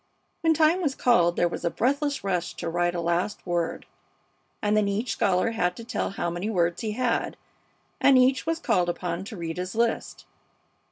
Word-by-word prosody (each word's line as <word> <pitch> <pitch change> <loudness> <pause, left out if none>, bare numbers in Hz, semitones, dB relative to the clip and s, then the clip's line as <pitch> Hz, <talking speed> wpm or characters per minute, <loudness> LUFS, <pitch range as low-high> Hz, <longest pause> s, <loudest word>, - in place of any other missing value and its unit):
When 325 -1 +3
time 320 +4 +3
was 285 -6 0
called 175 -8 +3
there 175 - +2
was 170 - -6
a 170 - +2
breathless 280 - 0
rush 180 -3 -2
to - - -5
write 175 +1 0
a - - -1
last 170 +4 -1
word, 175 -2 -2 0.7
and 210 0 +1
then 210 -1 +3
each 210 +5 -1
scholar 190 +3 +1
had 180 -5 0
to 230 - -7
tell 225 -2 -2
how 175 -3 -3
many 175 +5 -3
words 175 -3 0
he 215 -2 -2
had, 245 0 -1 0.6
and 275 -2 +6
each 255 +3 +3
was 325 0 +1
called 180 - +1
upon 175 +1 -3
to 215 0 -8
read 165 -1 -5
his 185 +3 -4
list. 230 0 -1
200 Hz, 190 wpm, -26 LUFS, 175-250 Hz, 0.7 s, and